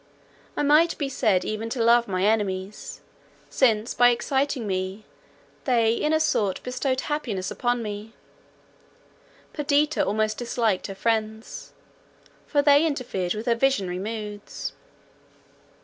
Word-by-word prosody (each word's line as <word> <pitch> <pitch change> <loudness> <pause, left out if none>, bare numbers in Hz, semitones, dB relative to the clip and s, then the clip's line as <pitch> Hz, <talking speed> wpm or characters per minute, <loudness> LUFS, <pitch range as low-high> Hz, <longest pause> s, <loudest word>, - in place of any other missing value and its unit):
I - - +1
might 305 +4 +4
be 280 -2 -2
said 215 -8 +1
even 215 +1 -3
to 235 -1 -1
love 235 +1 +5
my 185 -1 -1
enemies, 200 -2 -1 0.5
since 225 -4 +2
by 245 0 +6
exciting 265 +1 0
me 190 +2 -3 0.6
they 230 -3 +3
in 300 +6 0
a 315 - +3
sort 210 -11 +1
bestowed 260 +1 -1
happiness 225 -11 -3
upon 245 -1 -1
me; 210 +1 -6 1.4
Perdita 295 0 +1
almost 215 +1 0
disliked 230 -5 0
her 195 - -7
friends, 220 +1 -2 0.7
for 285 -1 +2
they 285 +1 +6
interfered 245 - -2
with 215 +2 -5
her 240 - +3
visionary 230 -8 0
moods. 210 0 -5
230 Hz, 125 wpm, -25 LUFS, 210-270 Hz, 1.4 s, by